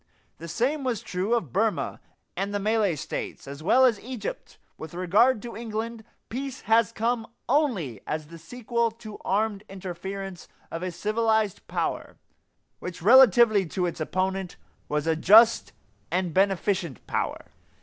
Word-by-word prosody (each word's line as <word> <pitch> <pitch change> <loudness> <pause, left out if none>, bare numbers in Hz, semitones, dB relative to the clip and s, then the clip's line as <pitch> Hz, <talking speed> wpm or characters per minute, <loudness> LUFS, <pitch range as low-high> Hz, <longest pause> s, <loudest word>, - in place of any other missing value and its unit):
The 165 - -7
same 270 - 0
was 245 -6 -2
true 190 +6 -1
of 165 - -3
Burma 220 +1 0 0.3
and 200 +1 -2
the - - 0
Malay 210 -3 +1
States, 140 - -6
as 140 +2 -8
well 255 +10 +5
as 230 -5 +3
Egypt, 240 -4 -6 0.2
with 160 +1 -9
regard 210 +7 +3
to 235 -3 -7
England. 225 0 -5 0.2
Peace 265 +2 -5
has 225 -2 +3
come 230 0 -1 0.2
only 225 - 0
as 155 0 -3
the 165 +2 -12
sequel 235 +5 -1
to 225 -1 -11
the - - -9
armed 210 0 0
interference 190 0 -6 0.2
of 165 - -4
a 185 - -2
civilized 215 +2 0
power - - -3 0.6
which, 175 -2 -7
relatively 235 -2 +7
to 180 +3 -1
its 170 - -4
opponent, 185 +2 -2 0.3
was 150 0 -1
a 165 -1 +2
just 220 +8 +6 0.4
and 180 0 -1
beneficent 190 - 0
power. - - -3
205 Hz, 150 wpm, -26 LUFS, 180-230 Hz, 0.6 s, relatively